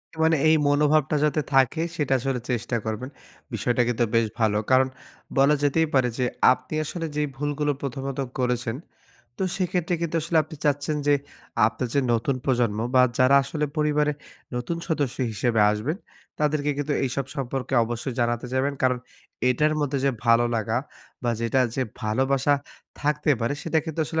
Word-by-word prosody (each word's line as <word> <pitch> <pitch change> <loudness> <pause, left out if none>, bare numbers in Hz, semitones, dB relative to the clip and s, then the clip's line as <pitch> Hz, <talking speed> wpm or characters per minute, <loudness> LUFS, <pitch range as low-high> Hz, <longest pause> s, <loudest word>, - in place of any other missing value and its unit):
এ - - -17
মানে 160 0 +4
এই 160 - +6
মনোভাবটা 150 +1 +3
যাতে 150 0 +2
থাকে 135 +4 +3
সেটা 145 -4 0
আসলে 135 0 -1
চেষ্টা 120 0 -2
করবেন। 110 +4 -3 0.4
বিষয়টা 120 0 +1
কিন্তু 120 0 +1
বেশ 115 -1 +4
ভালো। 105 -2 +2
কারণ 130 0 +5 0.5
বলা 140 +2 +5
যেতেই 160 +3 +3
পারে 130 -2 +3
যে 125 - +1 0.3
আপনি 130 +3 -3
আসলে 165 +2 -4
যে 150 - +1
ভুলগুলো 145 +1 -1
প্রথমত 135 0 -4 0.2
করেছেন। 125 -2 0 0.6
তো - - -1
সেক্ষেত্রে 180 -2 0
কিন্তু 165 0 -1
আসলে 170 +1 -1
আপনি 155 0 -10
চাচ্ছেন 145 +1 +1
যে 145 - +5 0.5
আপনার 125 +2 -2
যে 140 - +4
নতুন 120 +4 +1
প্রজন্ম 120 -5 +1 0.2
বা 130 - +7 0.2
যারা 130 +2 +6
আসলে 150 +2 -2
পরিবারে 150 0 +2 0.4
নতুন 125 +8 -2
সদস্য 145 -6 -1 0.2
হিসেবে 110 +2 +1
আসবেন। 115 - -2 0.4
তাদেরকে 150 -1 +1
কিন্তু 145 0 -1
এইসব 135 +1 -2
সম্পর্কে 135 0 -3
অবশ্যই 120 +2 -4
জানাতে 120 +1 0
যাবেন 135 +2 +1
কারণ, 125 -1 +3 0.5
এটার 150 +5 +2
মধ্যে 140 -1 0
যে 140 - +4 0.2
ভালো 115 +1 +5
লাগা 110 +2 0 0.4
বা 120 - +1
যেটা 115 +3 +1
যে 130 - 0 0.2
ভালোবাসা 135 +6 +2 0.5
থাকতে 150 +1 +1
পারে। 115 +5 0
সেটা 165 -1 +1
কিন্তু 160 0 -4
আসলে 160 -1 -1
135 Hz, 165 wpm, -25 LUFS, 120-150 Hz, 0.6 s, বা